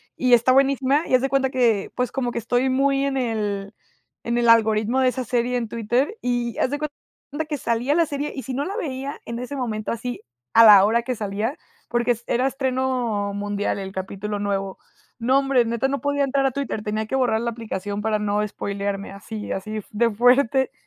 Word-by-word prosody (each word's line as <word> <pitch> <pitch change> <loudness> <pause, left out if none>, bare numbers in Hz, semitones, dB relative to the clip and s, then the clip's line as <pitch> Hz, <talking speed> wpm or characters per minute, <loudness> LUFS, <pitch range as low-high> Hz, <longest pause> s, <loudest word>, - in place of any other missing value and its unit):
Y 255 -1 +2
está 240 +2 +5
buenísima, 275 +2 +3
y 255 - +4
haz 250 - +3
de 270 - +1
cuenta 270 -1 +2
que, 235 -6 +1
pues, 250 0 -1
como 245 -3 -2
que - - -5
estoy 245 +3 +1
muy 275 +1 +2
en 275 -1 -1
el 210 -5 -2 0.5
en 235 +1 0
el 240 - +2
algoritmo 220 +1 +4
de 260 - +4
esa 255 +1 -3
serie 245 +1 0
en 235 -2 -2
Twitter, 240 - -1
y 240 -2 -1
haz - - +2
de 290 - -2
cuenta 300 0 -7
que 295 - -2
salía 245 +3 0
la 335 0 +4
serie 290 -1 -3
y 265 - -5
si 260 - -5
no 275 - -1
la 390 +7 -4
veía 275 - -4
en 235 0 -5
ese 250 +3 -5
momento 220 -4 -3
así, 240 +2 -4 0.3
a 230 - +8
la 205 -3 +9
hora 230 +3 +2
que 255 -1 -2
salía, 210 - -3 0.3
porque 240 +1 +1
es 235 0 -3
era 250 +2 +1
estreno 255 -6 -1
mundial 205 0 -2
el 190 -1 -6
capítulo 200 +2 -4
nuevo. 195 -1 -2 0.4
No, 255 +4 +3
hombre, 270 -3 +2
neta, 235 +3 0
no 280 0 -1
podía 285 0 +1
entrar 275 0 +1
a 270 - +2
Twitter, 270 -5 -3
tenía 215 +1 -2
que 265 - -2
borrar 245 -4 +1
la 235 - -1
aplicación 205 -3 -5
para 215 0 0
no 210 0 0
espoilearme 200 -1 -4
así 210 +2 -7
así 215 +3 -4
de 230 +2 +2
fuerte. 250 +3 +3
240 Hz, 210 wpm, -23 LUFS, 215-265 Hz, 0.5 s, la